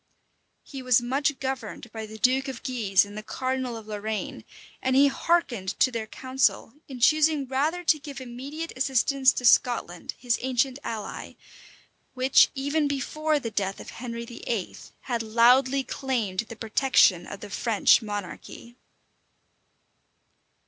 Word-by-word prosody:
[] - - -47
He 270 -2 -8
was 255 -2 +4
much 275 +4 -1
governed 255 -3 -5
by 220 -1 -6
the 220 +1 -10
duke 260 +5 +2
of 260 -3 -7
Guise 215 -8 +2
and 205 0 -12
the 215 - -5
cardinal 255 +1 -3
of 220 - -10
Lorraine; 215 0 -5 0.4
and 260 0 +1
he 275 +1 +6
hearkened 245 - -1
to 255 - +4
their 225 -2 -4
counsel, 260 -1 0
in 260 -3 -8
choosing 305 +2 +3
rather 295 +7 -1
to 320 -2 +3
give 275 -2 -8
immediate 270 +6 -7
assistance 265 0 +3
to 250 - -4
Scotland, 230 -8 +2
his 240 -1 -1
ancient 260 +1 0
ally, 220 -2 -6 0.8
which, 260 +1 +5
even 285 +3 0
before 300 +2 -1
the 230 -4 -5
death 195 -2 -2
of - - -9
Henry 235 -1 -6
VIII. 230 -4 -4 0.3
had 240 -3 -2
loudly 250 +5 +4
claimed 235 -10 -3
the 230 - -7
protection 220 -6 +3
of 200 - -8
the 210 - -9
French 225 +2 +3
monarchy. 210 +3 -7
250 Hz, 145 wpm, -26 LUFS, 225-270 Hz, 0.8 s, he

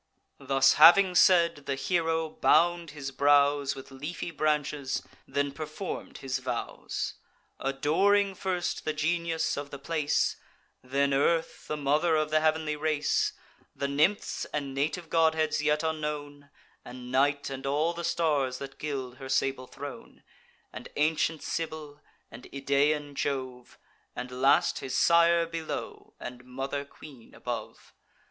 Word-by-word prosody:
Thus 135 -1 +4
having 180 +3 +8
said, 170 -5 +4
the 140 - 0
hero 165 +1 0
bound 170 +2 +2
his 140 -2 -6
brows 140 0 +3
With 135 0 -11
leafy 150 +6 -5
branches, 150 -3 -1 0.2
then 140 0 -1
perform'd 155 +5 -6
his 130 -1 -1
vows; 125 -2 -4 0.5
Adoring 190 +9 +2
first 185 -2 -2
the 155 - -1
genius 165 +1 -1
of 145 0 -5
the 140 - -7
place, 150 +1 0 0.5
Then 140 +2 +1
Earth, 165 +4 0
the 150 - -2
mother 150 +4 +2
of 155 0 0
the 155 - +4
heav'nly 155 -1 +1
race, 150 0 0 0.4
The 140 - -2
nymphs, 155 +9 +1
and 140 -2 -4
native 150 +5 -2
godheads 160 -1 +2
yet 150 +1 +1
unknown, 150 -2 -4 0.3
And 125 0 -9
Night, 140 +1 +1
and 135 0 -5
all 150 +5 +1
the 170 0 -6
stars 145 -8 0
that 140 0 -9
gild 130 -4 -4
her 135 -1 -8
sable 130 -1 0
throne, - - -10 0.5
And - - -8
ancient 155 +1 +1
Cybel, 155 -3 -5 0.3
and 120 +3 -11
Idaean 145 +2 +1
Jove, 130 -3 -4 0.4
And 125 0 -6
last 135 +1 +4
his 130 0 -3
sire 170 0 +5
below, 165 -1 -6
and 125 0 -8
mother 135 +3 -4
queen 140 -4 -14
above. 120 -3 -6
145 Hz, 135 wpm, -28 LUFS, 135-160 Hz, 0.5 s, having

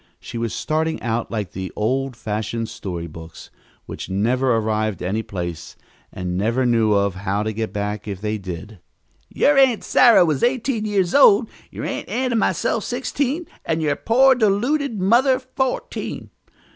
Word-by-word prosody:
She 115 - -7
was 115 -2 -2
starting 160 +1 -1
out 115 0 -1
like 105 -5 -4
the 95 0 -6
old 130 +4 -1
fashioned 110 0 -3
story 90 -5 -5
books, 80 0 -11 0.3
which - - -7
never 125 +7 +1
arrived 110 -3 -1
any 100 +5 -1
place, 85 -6 -6 0.4
and 90 -1 -4
never 115 +7 +1
knew 115 -3 +3 0.2
how 100 +2 -2
to 110 0 -2
get 110 +1 -3
back 105 +1 -4
if 100 -3 -5
they 105 +1 -2
did. 95 +2 -8 0.5
"Your 290 -1 +3
Aunt 255 -5 +4
Sarah 235 -7 +6
was 155 -5 0
eighteen 245 -2 0
years 195 -4 0
old, 225 -5 +6 0.2
your - - -6
Aunt - - -4
Ann 255 0 -1
and 230 - +2
myself - - 0
sixteen, 290 +5 -2 0.2
and 165 -1 -1
your 145 -2 +1
poor, 260 - +4
deluded 240 +3 +1
mother 245 +8 +4
fourteen. 260 0 -4
120 Hz, 160 wpm, -21 LUFS, -, 0.5 s, Sarah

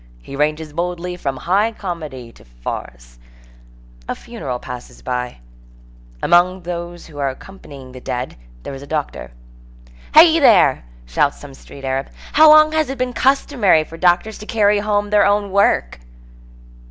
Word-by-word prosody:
He 135 - -10
ranges 150 +1 -1
boldly 180 +1 -3
from 135 -6 -4
high 200 - +1
comedy 155 - -7
to - - -19
farce. - - -8 0.9
A - - -2
funeral 215 - -6
passes 125 0 -10
by. 125 - -4 0.8
Among 180 +1 +3
those 175 0 -6
who 150 -3 -12
accompany 140 -1 -7
the 130 0 -11
dead 125 +1 -4 0.3
there - - -7
is 135 - -8
a 140 - -11
doctor. 150 -1 -4 0.9
"Hey 325 +1 +8
there!" 195 - +4 0.2
shouts - - 0
some 145 -2 -11
street 135 +1 -12
Arab, 135 +1 -2 0.2
"how 310 +1 +7
long 310 0 +7
has 315 -3 0
it 270 - -4
been 250 0 -2
customary 250 - +2
for 160 - -12
doctors 180 +5 +1
to 210 - -10
carry 210 -2 +2
home 205 0 -1
their 210 -1 +5
own 205 -1 +1
work?" 200 - +1
175 Hz, 150 wpm, -19 LUFS, 135-210 Hz, 0.9 s, Hey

